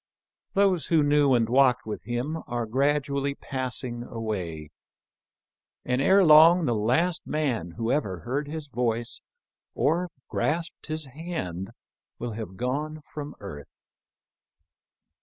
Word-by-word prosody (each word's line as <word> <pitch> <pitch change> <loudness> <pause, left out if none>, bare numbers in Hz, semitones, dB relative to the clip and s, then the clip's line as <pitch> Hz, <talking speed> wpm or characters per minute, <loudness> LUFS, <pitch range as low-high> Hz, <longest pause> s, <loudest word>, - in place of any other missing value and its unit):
Those 195 -6 +3
who 160 -3 +4
knew 145 -2 +4
and 115 -2 +2
walked 130 0 +4
with 110 - -6
him 125 +7 -2
are 120 -1 -2
gradually 140 +3 0
passing 130 -3 -4
away, 95 -11 -5 1.1
and 125 +1 +1
ere 190 +7 +5
long 165 +2 +7
the 120 - +1
last 130 +12 +1
man 125 - -1
who 115 0 -1
ever 100 - -1
heard 140 - -2
his 155 0 -5
voice 120 -2 -2 0.5
or 170 +5 +1 0.2
grasped 165 +2 -2
his 155 -1 -2
hand 130 - -5 0.5
will 120 0 -4
have 105 -4 -7
gone 150 +5 -2
from 150 -1 -6
earth. 75 -9 -10
135 Hz, 120 wpm, -26 LUFS, 115-155 Hz, 1.1 s, long